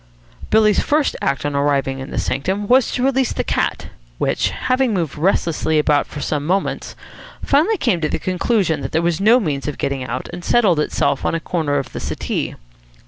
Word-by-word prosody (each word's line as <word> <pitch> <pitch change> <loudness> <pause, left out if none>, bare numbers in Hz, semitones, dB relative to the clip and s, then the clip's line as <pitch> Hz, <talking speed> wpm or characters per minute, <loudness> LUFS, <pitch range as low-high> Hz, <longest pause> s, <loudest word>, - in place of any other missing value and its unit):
Billy's 215 -1 +4
first 295 -1 +1
act 140 +1 -1
on 145 -1 -2
arriving 140 -2 0
in 135 - -7
this - - -2
sanctum 190 +10 -1
was 255 +1 +4
to 250 - -1
release 265 -2 +1
the - - -2
cat, - - -1 0.3
which, - - 0
having 255 -3 0
moved 165 -6 -2
restlessly 160 -1 +1
about 150 -1 +2
for 150 - -8
some 145 -1 -1
moments, 190 +5 -1 0.5
finally 320 +10 +3
came 200 - +1
to 155 - 0
the - - -1
conclusion 185 -3 0
that 135 - -5
there 160 +1 +1
was 170 +1 0
no 225 +5 +6
means 150 - -2
of 150 - -4
getting 140 -2 -2
out, 125 0 -4
and 175 0 -7
settled 195 -9 +3
itself 150 - 0
on - - 0
a - - -1
corner 160 -4 -1
of 135 -2 -2
the - - -4
settee. - - -3
170 Hz, 195 wpm, -19 LUFS, 145-220 Hz, 0.5 s, no